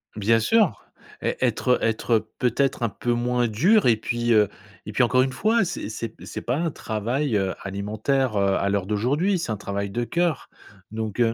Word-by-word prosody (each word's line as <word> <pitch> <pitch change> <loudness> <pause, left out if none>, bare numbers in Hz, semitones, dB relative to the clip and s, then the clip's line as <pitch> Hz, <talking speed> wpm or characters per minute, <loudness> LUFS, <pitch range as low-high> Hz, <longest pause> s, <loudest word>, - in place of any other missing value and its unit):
Bien 110 +2 +3
sûr. 190 - +2 0.4
Ê - - -1
être, 125 0 0
heu, - - -2
être, 115 +1 -1
heu, 110 - 0
peut-être 125 0 0
un 115 - +1
peu 110 +5 -3
moins 120 0 +1
dur 170 - +3
et 115 - +5
puis, 120 +1 -1
heu, 105 -2 +5 0.4
et - - -6
puis, - - +2
encore 125 +2 +3
une 130 - -1
fois, 220 - +2
c'est 175 - -4
c'est 110 +1 -4
p - - -15
c'est - - -6
pas 125 +4 -1
un 165 0 0
travail, 120 +4 -2
heu, 95 -1 0
alimentaire, 110 +5 -1
heu, 100 -1 +2
à 100 - 0
l'heure 100 -2 0
d'aujourd'hui, 145 - +1
c'est 140 - -3
un 110 - -2
travail 100 0 -3
de 120 +5 -2
cœur, 170 +1 -1 0.4
donc, 110 0 -4
heu, 115 -1 +3
120 Hz, 210 wpm, -24 LUFS, 105-135 Hz, 0.4 s, et